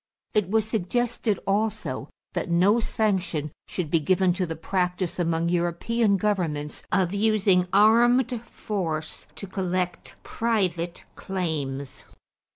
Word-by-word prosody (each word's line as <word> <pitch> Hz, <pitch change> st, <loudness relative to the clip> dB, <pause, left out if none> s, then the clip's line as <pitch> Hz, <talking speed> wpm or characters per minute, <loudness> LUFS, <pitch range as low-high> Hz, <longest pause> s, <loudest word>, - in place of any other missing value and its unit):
It 210 Hz, -5 st, +1 dB
was 220 Hz, +1 st, +2 dB
suggested 225 Hz, 0 st, 0 dB
also 210 Hz, +2 st, -1 dB, 0.2 s
that -, -, -2 dB
no 185 Hz, +7 st, +4 dB
sanction 190 Hz, -10 st, -1 dB, 0.2 s
should 165 Hz, -5 st, -4 dB
be 165 Hz, -, +4 dB
given 185 Hz, +3 st, +2 dB
to 180 Hz, 0 st, -1 dB
the 165 Hz, -, -4 dB
practice 180 Hz, +2 st, -1 dB
among 165 Hz, -1 st, +1 dB
European 185 Hz, +5 st, +1 dB
governments 170 Hz, -8 st, -1 dB
of 185 Hz, -1 st, +2 dB
using 200 Hz, -3 st, +3 dB
armed 235 Hz, +4 st, +4 dB
force 160 Hz, -7 st, -4 dB
to -, -, -7 dB
collect 185 Hz, -2 st, -3 dB
private 180 Hz, -7 st, -1 dB
claims. 145 Hz, -8 st, -4 dB
185 Hz, 115 wpm, -25 LUFS, 170-215 Hz, 0.2 s, no